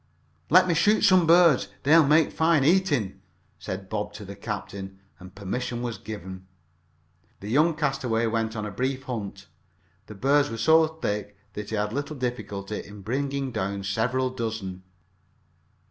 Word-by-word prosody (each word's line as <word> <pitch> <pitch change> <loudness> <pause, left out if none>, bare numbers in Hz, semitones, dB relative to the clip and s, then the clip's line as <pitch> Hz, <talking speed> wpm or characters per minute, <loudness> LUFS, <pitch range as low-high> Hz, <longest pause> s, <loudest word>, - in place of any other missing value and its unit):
"Let 185 +3 +6
me 175 - +2
shoot 205 +7 +3
some 185 -3 +5
birds 170 -4 +5 0.2
they 150 +4 +5
will 160 -4 +6
make 155 +1 +4
fine 160 -3 +3
eating," 145 - +1 0.4
said 95 +1 -6
Bob 105 0 -3
to 105 0 -9
the 100 +1 -8
captain, 95 -3 -6 0.2
and 90 +1 -13
permission 120 +4 -4
being 120 -1 -2
given, 95 -3 -8 0.9
the 100 - -7
young 155 +5 +3
castaway 135 -6 0
went 115 0 -1
on 105 -1 -3
a 105 - -5
brief 130 +5 -2
hunt. 115 -7 -6 0.6
The 105 - -10
birds 140 +7 +2
were 115 - -5
so 160 +6 +5
thick 105 -10 -4 0.2
that 105 0 -6
he 110 - -2
had 105 +1 -1
little 145 +3 -3
difficulty 110 -6 -4
in 105 0 -12
bringing 135 +3 -2
down 100 -3 -3
several 125 +6 0
dozen. 110 -7 -4
115 Hz, 160 wpm, -26 LUFS, 105-145 Hz, 0.9 s, Let